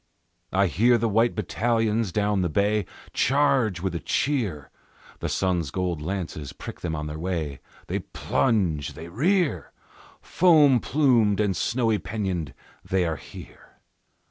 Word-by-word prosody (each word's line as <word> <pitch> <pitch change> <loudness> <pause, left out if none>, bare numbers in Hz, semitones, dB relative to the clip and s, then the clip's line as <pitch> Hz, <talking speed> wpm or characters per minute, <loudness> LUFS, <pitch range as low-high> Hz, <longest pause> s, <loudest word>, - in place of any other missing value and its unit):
I 100 +1 +3
hear 115 - +3
the 115 - 0
white 115 +3 +2
battalions 110 0 0
down 105 0 +1
the 90 - 0
bay 100 +3 +1 0.3
Charge 130 -8 +2
with 95 -2 -2
a 85 - -2
cheer; 105 - -1 0.5
The - - -3
sun's 90 -5 0
gold 90 -1 -2
lances 80 -4 -4
prick - - -9
them 80 -2 -2
on 75 0 -4
their 75 +1 -6
way, 80 -6 -3 0.3
They - - -2
plunge, 80 - 0
they 80 - -9
rear, 145 - 0 0.5
Foam 150 -8 +4
plumed 120 -7 +2
and 100 -3 +1
snowy 115 -4 +1
pennoned, 90 - -3 0.3
they 95 -1 0
are 80 -2 -2
here! - - -13
100 Hz, 140 wpm, -25 LUFS, 85-115 Hz, 0.5 s, Foam